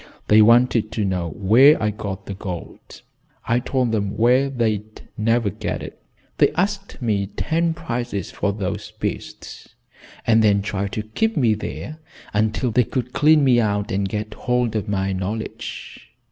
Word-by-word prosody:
They 110 +1 +7
wanted 115 -1 +4
to 105 - -1
know 90 -3 -1
where 115 - +5
I 105 -1 0
got 100 -2 -6
the 100 - -5
gold. 95 -3 -8 0.4
I 120 +1 +2
told 125 -1 -1
them 100 -3 -1
where 125 +4 +3
they'd 110 -4 -2 0.2
never 115 -1 +1
get - - -4
it. - - -10 0.4
They - - +5
asked 195 -1 -2
me 100 -4 0
ten 165 - -1
prices 120 - -4
for 100 - -1
those 100 +1 -4
beasts, - - -7 0.5
and 110 -1 +4
then 100 -2 +3
tried 100 -1 -3
to 110 - -2
keep 220 - -1
me 120 -6 +3
there 150 +8 -6 0.3
until 110 +4 0
they 125 +3 +3
could 125 0 -4
clean 155 0 +5
me 125 -3 +4
out 105 -2 -1
and 95 0 -1
get 105 0 -4
hold 125 -1 -1
of 105 -1 -2
my 95 -1 0
knowledge. 100 +4 -5
110 Hz, 160 wpm, -22 LUFS, 100-125 Hz, 0.5 s, They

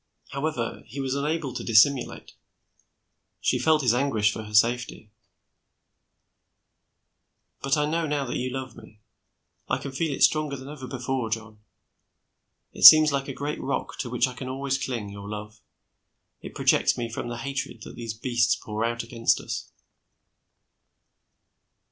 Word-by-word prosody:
However, 140 -5 -3
he 125 +5 -8
was 135 -1 -2
unable 145 -1 -2
to - - -5
dissimulate. 125 +4 +2 1.1
She - - +1
felt 155 -2 +3
his 120 -3 +3
anguish 115 -5 +1
for - - -6
her 105 -1 -10
safety. 115 -1 +1 2.5
"But 135 +2 +1
I 150 - +2
know 165 +2 -1
now 145 -1 -1
that 120 - -4
you 125 +1 -2
love 130 0 -6
me. 110 -1 -15 0.7
I 130 - +1
can 140 +1 -7
feel 150 +3 -2
it 135 - 0
stronger 150 -2 +2
than 130 +1 -10
ever 145 -3 -8
before, 130 -2 -3
John. 110 -1 -5 1.1
It - - -7
seems 155 -1 +11
like 140 -1 -2
a - - -4
great 145 +3 -4
rock 140 - -3
to 125 - -3
which 125 0 +2
I 125 - -7
can 130 +1 -7
always 135 0 -2
cling, 115 -6 -4
your 100 0 -9
love. 105 +1 -8 0.8
It - - -10
projects - - +2
me 120 - -2
from 115 +1 -5
the 120 0 -5
hatred 130 -3 -5
that - - -10
these 115 -2 -6
beasts 120 -1 +1
pour 105 +1 -5
out 115 0 -1
against 115 0 +1
us." - - -6
130 Hz, 155 wpm, -26 LUFS, 115-140 Hz, 2.5 s, seems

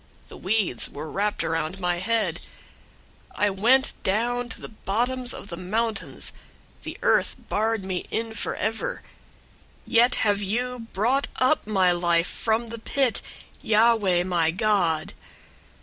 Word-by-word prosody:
The - - -10
weeds 190 - 0
were 150 +2 -7
wrapped 205 +1 0
around 165 +3 -2
my 180 -1 +1
head. 195 -3 0 1.0
002:006 - - -1
I 205 - +5
went 245 +8 +3
down 240 +5 0
to - - -7
the - - -8
bottoms 245 +4 -1
of 205 - -6
the 170 - -5
mountains. 215 +4 -2 0.5
The - - -7
earth - - +3
barred 220 0 0
me 185 -1 -3
in 225 0 -2
forever: 220 +1 -3 0.8
yet 240 0 +4
have 205 -1 +2
you 235 +3 -2
brought 245 +8 +1
up 255 -1 +2
my 190 -4 +3
life 175 -1 +2
from 225 +3 -1
the 230 0 -6
pit, 260 +2 0 0.4
Yahweh 215 -5 +3
my 175 -3 +1
God. 175 -5 +1
210 Hz, 135 wpm, -25 LUFS, 180-230 Hz, 1.0 s, I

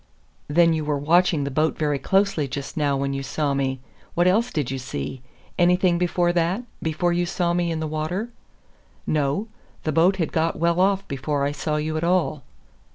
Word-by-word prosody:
"Then 165 +2 +4
you 160 -1 -1
were 150 -1 0
watching 160 +1 +3
the 140 - -3
boat 155 +3 +1
very 150 -2 0
closely 195 -6 +1
just 135 +1 -6
now 145 -3 +1
when 140 0 -1
you 135 - -3
saw 145 +1 -1
me. 135 -1 -1 0.3
What 175 - +3
else 220 +7 +3
did 145 -5 -2
you 135 - -3
see? 125 - -5 0.4
Anything 180 0 +3
before 175 0 +1
that 175 +6 0 0.2
before 175 +2 0
you 175 0 0
saw 175 0 0
me 175 -1 0
in 165 -1 -2
the 160 - -2
water?" 155 +9 -3 0.7
"No 150 +7 0 0.4
the 155 - 0
boat 170 +5 +4
had 170 -4 -2
got 165 0 +1
well 170 +2 +1
off 195 +1 +2
before 140 +1 -2
I 140 - +1
saw 150 +2 -2
you 155 +1 -1
at 155 - -2
all." 170 -4 +1
160 Hz, 195 wpm, -23 LUFS, 145-175 Hz, 0.7 s, Then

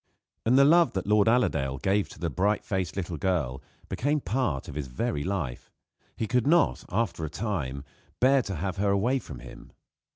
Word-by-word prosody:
And 125 +3 +5
the 140 - +7
love 170 +3 +5
that 95 - -2
Lord 105 0 +3
Allerdale 70 - +2
gave 100 +7 +1
to - - -12
the 85 -2 -2
bright 100 +8 0
faced 95 -2 -2
little 90 -3 -3
girl 75 -7 -1 0.3
became 145 +4 0
part 115 - -1
of - - -7
his 75 -2 -4
very 65 +3 -2
life. 85 -10 -3 0.5
He 110 - -1
could 125 +3 +1
not, 170 +2 +3
after 95 -5 -1
a 80 - -2
time, 75 - -3 0.4
bear 135 +2 +5
to 100 -5 -5
have 90 +3 -3
her 100 +1 +1
away 115 +7 +2
from 70 - -10
him. - - -12
100 Hz, 190 wpm, -27 LUFS, 75-115 Hz, 0.5 s, the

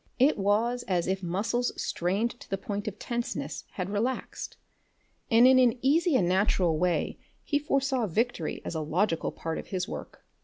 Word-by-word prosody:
It 275 +4 +5
was 215 +5 +1
as 180 -3 +1
if 190 +1 -1
muscles 205 +7 -1
strained 195 +7 0
to - - -13
the 195 - -1
point 205 +2 -4
of 210 -1 -4
tenseness 235 +2 -4
had 185 -1 -3
relaxed, 230 +6 -3 0.7
and 230 +2 +6
in 260 0 +7
an 250 -1 +4
easy 315 +3 +3
and 185 -8 +3
natural 180 -3 +2
way 180 -1 0 0.2
he 290 - +1
foresaw 275 -4 0
victory 215 -2 -1
as - - -3
a 160 - -2
logical 165 +3 0
part 165 0 -4
of - - -8
his 185 0 -2
work. - - -8
205 Hz, 175 wpm, -28 LUFS, 180-245 Hz, 0.7 s, in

